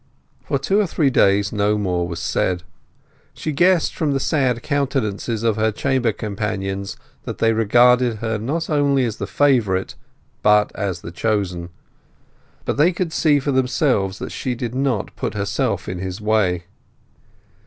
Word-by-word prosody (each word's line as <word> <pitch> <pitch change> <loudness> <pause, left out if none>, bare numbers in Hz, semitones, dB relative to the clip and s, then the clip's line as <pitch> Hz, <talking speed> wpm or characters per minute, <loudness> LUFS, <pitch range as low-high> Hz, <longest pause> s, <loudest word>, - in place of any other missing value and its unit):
For - - -1
two 175 +10 +1
or 205 - +2
three 150 -4 +1
days 100 -2 +3
no 105 0 +1
more 90 -4 -1
was 85 -1 -5
said. 85 +2 -1 0.7
She 155 - -3
guessed 175 +3 +3
from 150 -3 0
the 135 - 0
sad 130 -5 0
countenances 125 -6 -1
of 115 -2 +1
her 110 0 +2
chamber 130 0 0
companions 100 -2 -4 0.3
that - - -5
they 115 0 +2
regarded 120 +2 +4
her 110 0 -3
not 155 +9 -2
only 140 -3 +2
as 115 -2 -3
the - - -4
favourite, 115 -10 +1 0.5
but 105 0 +4
as 95 -4 -3
the 85 - -8
chosen; 90 -3 -1 1.0
but - - -1
they 160 +5 +5
could 175 -2 -3
see 150 -4 +3
for 140 +1 -1
themselves 125 - +1
that - - -6
she 125 -2 -3
did 120 0 -4
not 130 -5 -1
put - - -4
herself 100 -3 -1
in 90 - -4
his 95 0 -5
way. 105 -5 +1
110 Hz, 160 wpm, -21 LUFS, 100-140 Hz, 1.0 s, they